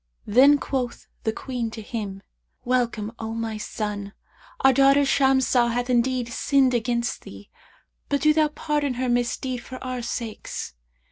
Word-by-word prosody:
Then 270 +7 +6
quoth 255 -4 -3 0.2
the 220 - +2
Queen 245 0 -4
to 225 0 -8
him, 205 -4 -5 0.4
'Welcome, 240 -4 0
O 225 0 -4
my 225 -1 -3
son, 210 -2 -4 0.5
our 265 0 +6
daughter 275 +2 +5
Shamsah 265 -3 +3
hath 245 +1 -1
indeed 245 0 +1
sinned 265 +2 +2
against 240 0 -1
thee, - - -12 0.6
but 285 -1 +1
do 305 0 +5
thou 310 0 +3
pardon 295 -3 -1
her 255 +1 -1
misdeed 245 +1 0
for 255 - -9
our 255 -1 -3
sakes.' 230 - -5
245 Hz, 145 wpm, -24 LUFS, 230-265 Hz, 0.6 s, Then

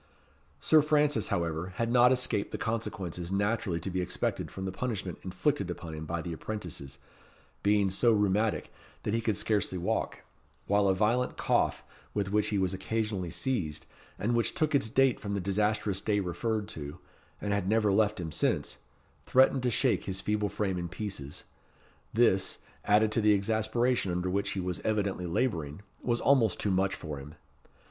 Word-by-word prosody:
Sir 155 -1 +5
Francis, 150 -5 +2
however, 85 +1 -2
had 115 +2 -1
not 125 0 +6
escaped 125 -5 +1
the - - -3
consequences 95 -6 -3
naturally 100 -2 0
to 95 - -4
be 90 0 -1
expected 90 - -2
from 95 - -6
the 95 - -2
punishment 95 -4 -3
inflicted 100 - -1
upon 85 -2 -6
him 80 0 -6
by 85 0 -2
the 85 - -4
apprentices, 80 -8 -5 0.6
being 100 -1 +3
so 115 +5 +4
rheumatic 105 +1 +1 0.3
that 105 - -1
he 115 - +1
could 110 -3 0
scarcely 105 -4 0
walk, 90 +1 -2 0.4
while 100 0 +3
a 95 - +3
violent 115 +5 +1
cough, - - +1 0.3
with 100 -2 -1
which 105 0 +2
he 105 - 0
was 95 -1 +1
occasionally 100 -1 -2
seized, 80 - -2 0.3
and 115 +4 0
which 115 -1 +1
took 155 -1 +1
its 135 -6 +2
date 135 +1 +3
from 100 -1 -3
the - - 0
disastrous 100 +1 0
day 105 -1 +1
referred 105 +3 -2
to, 75 -5 -6 0.4
and 100 -1 -1
had 100 -2 0
never 105 -2 +3
left 105 0 +2
him 80 -2 -4
since, - - 0 0.5
threatened 130 +1 +5
to 125 - +1
shake 120 - +1
his 95 0 -3
feeble 105 +1 0
frame 95 -3 -1
in 85 -1 -4
pieces; 90 -7 -5 0.7
this, 105 -5 +2 0.3
added 105 +1 +4
to 115 - +1
the 105 0 +5
exasperation 110 +1 +1
under 90 +1 -1
which 100 +1 0
he 100 - -3
was 90 -1 -2
evidently 100 -4 -1
labouring, 85 - -1 0.2
was 120 -1 0
almost 120 -7 +3
too 100 - 0
much 95 +1 +1
for 75 -3 -6
him. 75 +3 -10
100 Hz, 175 wpm, -30 LUFS, 90-110 Hz, 0.7 s, not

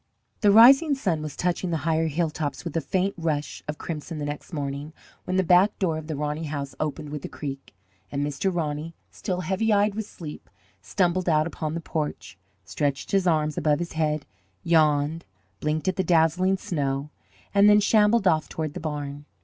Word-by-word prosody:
The 210 - +4
rising 270 +8 +7
sun 180 - -1
was 155 -2 -6
touching 180 +1 -1
the 165 - 0
higher 160 0 +2
hilltops 155 -1 -2
with 170 - -5
a 165 - +1
faint 190 +6 0
rush 155 -3 -2
of 150 0 -4
crimson 160 0 -6
the 145 - -3
next 145 +4 -6
morning 145 0 -4 0.3
when 185 - -2
the 190 - +3
back 180 +4 +4
door 165 -5 0
of 155 - -10
the 155 - -3
Roney 150 +2 -3
house 145 -2 -4
opened 155 0 -3
with 150 -2 -5
a - - -5
creak, 135 -6 -7 0.4
and 140 +1 -1
Mr. 145 +7 -1
Roney, 160 -1 -3 0.2
still 180 -1 -3
heavy 195 +5 0
eyed 205 0 +3
with 215 0 -4
sleep, 155 -4 -10 0.3
stumbled 180 -2 0
out 155 -1 +3
upon 160 -1 -4
the 170 - -3
porch, 150 - -4 0.3
stretched 140 +5 -2
his 195 -2 +2
arms 155 -3 +1
above 150 -1 +2
his 175 +1 -4
head, 155 -2 -1 0.4
yawned, 155 -1 +2 0.4
blinked 155 +3 -1
at 185 - 0
the 190 - +2
dazzling 175 +3 +3
snow, 140 -4 -2 0.4
and 200 +1 +6
then 210 0 +7
shambled 210 0 +4
off 160 -3 +2
toward 155 -2 -4
the 180 - -5
barn. 145 -2 -5
160 Hz, 190 wpm, -25 LUFS, 150-185 Hz, 0.4 s, rising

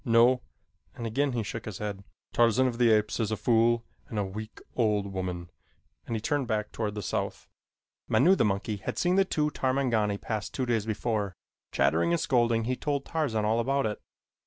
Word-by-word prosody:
No," 120 +2 +5 0.5
and 115 - -5
again 135 +4 0
he 115 -2 -1
shook 115 +2 -5
his 105 -4 -5
head. 100 -2 -4 0.3
"Tarzan 120 +2 +4
of 125 -2 -1
the 120 -1 +5
Apes 105 0 +2
is 110 -3 0
a 110 - -1
fool 115 0 +3 0.2
and 110 - -6
a 105 - +2
weak, 110 +3 -7 0.2
old 105 -4 +1
woman," 90 -2 -4 0.6
and 115 - -2
he - - -1
turned 140 +3 -1
back 110 -2 -1
toward 105 -2 -3
the 105 - -4
south. - - -3 0.6
Manu, 175 +8 +5
the - - +2
monkey, 105 +1 0
had 100 - -5
seen 180 +1 +2
the 195 0 +4
two 150 -4 0
Tarmangani 125 -7 +1
pass 110 +1 -3
two 130 - -2
days 115 -3 0
before. 105 -3 -1 0.4
Chattering 80 +5 +2
and 85 - +2
scolding, 120 -3 +2
he 125 +3 0
told 140 0 -2
Tarzan 130 -10 0
all 110 +2 +2
about 135 +3 +1
it. 105 -1 -3
115 Hz, 195 wpm, -28 LUFS, 105-125 Hz, 0.6 s, No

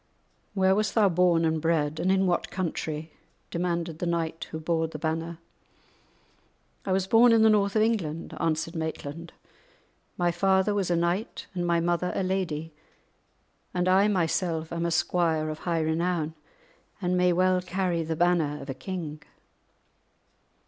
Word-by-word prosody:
"Where 190 -1 +4
wast 210 +1 0
thou 210 -3 +5
born 170 -1 +3
and 160 -1 0
bred, 155 -2 0
and 185 - +2
in 190 0 +3
what 180 -2 0
country?" 160 -3 -4 0.4
demanded 170 -2 -2
the 175 - -2
knight 165 -1 -2
who 160 - -5
bore 160 0 0
the 155 - -7
banner. 160 +2 -3 1.5
"I - - 0
was 190 0 +1
born 230 +4 +6
in 225 -1 +5
the 220 - +6
north 200 -1 +2
of 215 - +4
England," 170 -9 -2
answered 165 +1 -1
Maitland; 160 0 -5 0.9
"my 175 -1 +2
father 190 +3 +2
was 200 -3 0
a 175 - +2
knight 175 +7 -1
and 175 -1 -2
my 170 0 +3
mother 175 +1 0
a - - 0
lady, 165 -4 -2 1.0
and 180 0 +1
I 190 +3 +5
myself 170 -4 0
am 170 0 -1
a - - 0
squire 165 -2 +1
of 155 - -7
high 170 -2 -1
renown, 160 0 0 0.7
and 180 -2 0
may 180 0 +3
well 185 +1 +2
carry 180 -1 -1
the 160 0 -2
banner 165 -3 +1
of 140 -1 -6
a - - -4
king." 155 -1 -6
170 Hz, 160 wpm, -27 LUFS, 160-185 Hz, 1.5 s, born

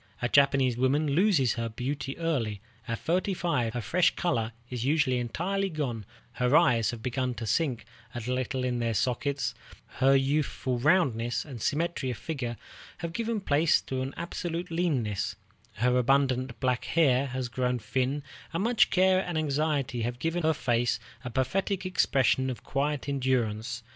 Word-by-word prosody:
A 120 - 0
Japanese 135 -2 +3
woman 140 +4 +2
loses 160 - +3
her 115 -1 -3
beauty 135 +4 -4
early. 130 -11 -1 0.3
At 115 -1 -2
thirty 185 - 0
five 125 -11 -1
her 120 - -1
fresh 170 - +2
color 115 -10 0 0.2
is 125 -2 -4
usually 135 -3 +2
entirely 190 +11 -1
gone, 125 - -3 0.3
her 125 +4 +2
eyes 120 -10 +3
have 115 -2 -6
begun 125 0 -1
to 115 - -5
sink 130 +1 0 0.3
a - - -2
little 125 +2 -2
in 125 -1 -1
their 115 -1 0
sockets, 130 +2 0 0.5
her 135 +1 +5
youthful 135 -2 0
roundness 125 -6 +2
and 130 -7 -8
symmetry 150 -1 -1
of 120 - -3
figure 125 -7 -4 0.4
have 170 -1 -5
given 230 0 -1
place 155 -1 +3
to 130 -1 -4
an 135 +1 -4
absolute 170 0 -4
leanness, 135 - -1 0.4
her 125 +3 +1
abundant 130 -1 +2
black 125 -2 0
hair 140 -5 +3
has 130 -1 -3
grown 125 0 -1
thin, 130 +5 -1 0.3
and 170 +4 0
much 235 0 +4
care 185 0 +4
and 175 -2 -3
anxiety 145 -4 0
have 120 +2 -2
given 165 +6 -1
her 160 -1 +2
face 120 -4 +1 0.2
a 125 - -4
pathetic 185 - -1
expression 135 -7 +2
of 125 - -6
quiet 145 0 -1
endurance. 125 -6 -1
130 Hz, 160 wpm, -28 LUFS, 120-160 Hz, 0.5 s, her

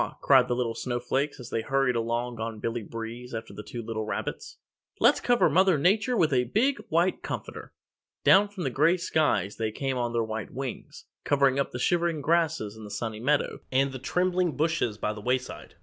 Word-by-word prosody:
cried - - +5
the 120 - 0
little 120 -2 -1
Snow 120 +1 -3
Flakes 135 +4 -1
as 125 - -9
they 115 - 0
hurried 135 +1 +1
along 115 +1 -2
on 110 0 -4
Billy 115 +2 -2
Breeze 115 +3 -7
after 110 0 -6
the - - -7
two 115 +3 -7
little 110 -1 -3
rabbits, 110 - -5 0.4
"Let's - - +5
cover 245 0 +3
Mother 190 -2 +4
Nature 210 - +2
with 155 -6 +3
a 125 -1 +3
big 250 - +1
white 170 +3 +1
comforter!" - - -6 0.5
Down 200 +2 +6
from 200 -3 -7
the 135 - -1
gray 155 +8 +3
skies 155 - 0
they 110 -1 -1
came 135 +2 -2
on 120 -1 -1
their 115 -1 0
white 110 0 -4
wings, 130 -1 -7 0.2
covering 140 -1 +3
up 140 - -1
the - - -5
shivering 170 +3 +1
grasses 155 -10 +1
in 110 - -11
the 105 - -8
Sunny 110 +1 -4
Meadow 145 +5 0
and 135 +1 +2
the 130 - -7
trembling 180 +1 0
bushes 155 -9 0
by 105 - -2
the 105 - -9
wayside. 125 +2 -3
130 Hz, 200 wpm, -27 LUFS, 115-160 Hz, 0.5 s, Down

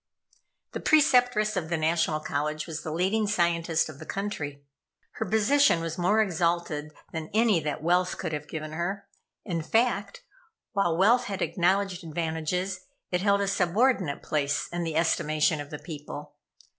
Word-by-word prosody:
The - - -4
Preceptress 245 -8 +4
of 165 -4 -2
the 170 - 0
National 160 -1 +1
College 150 +1 -2
was 160 -1 -5
the - - -5
leading 195 +6 +1
scientist 170 -4 +1
of 150 -3 -10
the - - -9
country. 150 -8 -4 0.6
Her - - -1
position 220 0 +4
was 165 +1 -4
more 205 +5 +4
exalted 170 -4 -1 0.2
than 160 -1 -5
any 220 -5 +4
that 150 -1 -4
wealth 180 +2 +2
could 160 - -4
have 150 0 -4
given 155 0 -5
her. 175 +5 -3 0.4
In 170 -3 -2
fact, 205 +1 0 0.5
while 175 -5 +1
wealth 235 +7 +4
had 200 -4 -2
acknowledged 185 0 +1
advantages, 165 +3 -2 0.3
it 180 0 +1
held 200 0 +3
a 200 - 0
subordinate 195 - +1
place 145 -2 0
in 175 0 -3
the 160 -1 -3
estimation 155 -1 +2
of 145 - -9
the 150 - -6
people. 150 -2 -8
175 Hz, 155 wpm, -27 LUFS, 155-200 Hz, 0.6 s, Preceptress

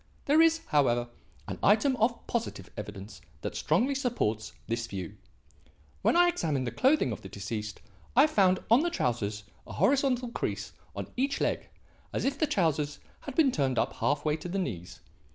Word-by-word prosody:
There 300 +3 +5
is, 325 0 +4
however, 120 -6 +2 0.4
an - - -5
item 225 +6 +4
of 235 +2 0
positive 215 - -3
evidence 105 0 -8 0.2
that - - -4
strongly 230 - +2
supports 235 - -1
this 115 0 -2
view. 95 -3 -6 0.9
When - - +3
I 350 0 +6
examined 150 - -1
the 120 - -2
clothing 265 - +3
of 105 - -5
the 95 - -9
deceased, 105 +2 -5 0.3
I 275 +4 +8
found 190 -11 +3
on 240 +5 +7
the 345 - +1
trousers 105 - -1 0.2
a - - -8
horizontal 260 -3 +2
crease - - -3 0.2
on - - -6
each 275 +3 0
leg - - -1 0.4
as - - -1
if 275 +1 -1
the 310 - +2
trousers 160 - 0 0.2
had 280 - -8
been 295 -5 +5
turned 135 - 0
up - - +1
half 145 +1 0
way 150 0 +2
to 175 - -7
the 190 - -2
knees. 90 - -4
170 Hz, 175 wpm, -29 LUFS, -, 0.9 s, I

